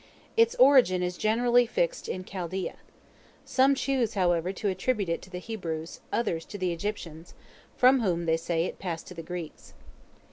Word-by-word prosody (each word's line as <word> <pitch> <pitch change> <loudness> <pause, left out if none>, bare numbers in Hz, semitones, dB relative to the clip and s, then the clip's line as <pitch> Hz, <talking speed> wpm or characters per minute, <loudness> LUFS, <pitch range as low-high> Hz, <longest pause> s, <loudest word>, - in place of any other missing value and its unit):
Its 460 0 +4
origin 250 -9 +5
is 180 0 -2
generally 240 +4 +3
fixed - - -1
in 185 - -3
Chaldea. 185 0 -4 0.7
Some 270 +1 +3
choose, 260 -5 0
however, 175 -2 +1
to 195 +2 -3
attribute 200 +1 0
it 170 - -1
to - - -13
the 180 - -6
Hebrews; 170 -6 -5
others 170 -8 -1
to 205 - -8
the 185 -2 -1
Egyptians, 170 -3 -6 0.4
from 260 +1 +6
whom, 175 -6 0
they 160 0 +2
say, 165 0 -1
it - - -6
passed 170 -4 -4
to - - -8
the 170 - -7
Greeks. 170 -1 -8
185 Hz, 170 wpm, -28 LUFS, 170-240 Hz, 0.7 s, from